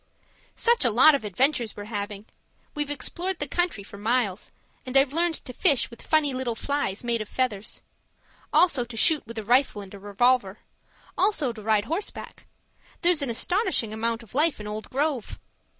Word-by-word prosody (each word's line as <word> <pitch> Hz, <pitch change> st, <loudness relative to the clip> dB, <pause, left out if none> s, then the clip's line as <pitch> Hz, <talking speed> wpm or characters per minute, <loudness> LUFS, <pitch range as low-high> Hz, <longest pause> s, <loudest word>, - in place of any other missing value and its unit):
Such 470 Hz, 0 st, +2 dB
a 245 Hz, -, +4 dB
lot 250 Hz, +8 st, +6 dB
of 280 Hz, -, 0 dB
adventures 240 Hz, +3 st, +1 dB
we're 205 Hz, -, -6 dB
having! 205 Hz, -1 st, -5 dB, 0.5 s
We've 295 Hz, -1 st, -3 dB
explored 350 Hz, +6 st, -1 dB
the 290 Hz, -, -2 dB
country 350 Hz, -, -1 dB
for 200 Hz, 0 st, -12 dB
miles, 215 Hz, -3 st, -1 dB, 0.3 s
and 255 Hz, +1 st, 0 dB
I've 270 Hz, 0 st, +3 dB
learned 335 Hz, +1 st, +1 dB
to 250 Hz, -, -8 dB
fish 280 Hz, -5 st, +2 dB
with 235 Hz, -, -12 dB
funny 305 Hz, -3 st, +2 dB
little 255 Hz, -3 st, -2 dB
flies 280 Hz, -6 st, -2 dB
made 235 Hz, -2 st, -1 dB
of 215 Hz, -, -7 dB
feathers. 220 Hz, -6 st, -3 dB, 0.7 s
Also 310 Hz, -8 st, +3 dB
to 240 Hz, -1 st, -9 dB
shoot 305 Hz, +6 st, +4 dB
with 230 Hz, 0 st, -9 dB
a 220 Hz, -, -3 dB
rifle 245 Hz, 0 st, +2 dB
and 195 Hz, -, -13 dB
a 200 Hz, -, -9 dB
revolver. 205 Hz, 0 st, +1 dB, 0.6 s
Also 350 Hz, -, +1 dB
to 220 Hz, -, -10 dB
ride 210 Hz, -1 st, +1 dB
horseback 335 Hz, -, -5 dB, 0.5 s
there's 345 Hz, -3 st, +2 dB
an 275 Hz, -, 0 dB
astonishing 350 Hz, -, +1 dB
amount 230 Hz, +1 st, -2 dB
of 225 Hz, -, -18 dB
life 300 Hz, +1 st, +2 dB
in 210 Hz, -, -7 dB
old 210 Hz, +1 st, -6 dB
Grove. 275 Hz, -4 st, -2 dB
245 Hz, 180 wpm, -25 LUFS, 215-295 Hz, 0.7 s, lot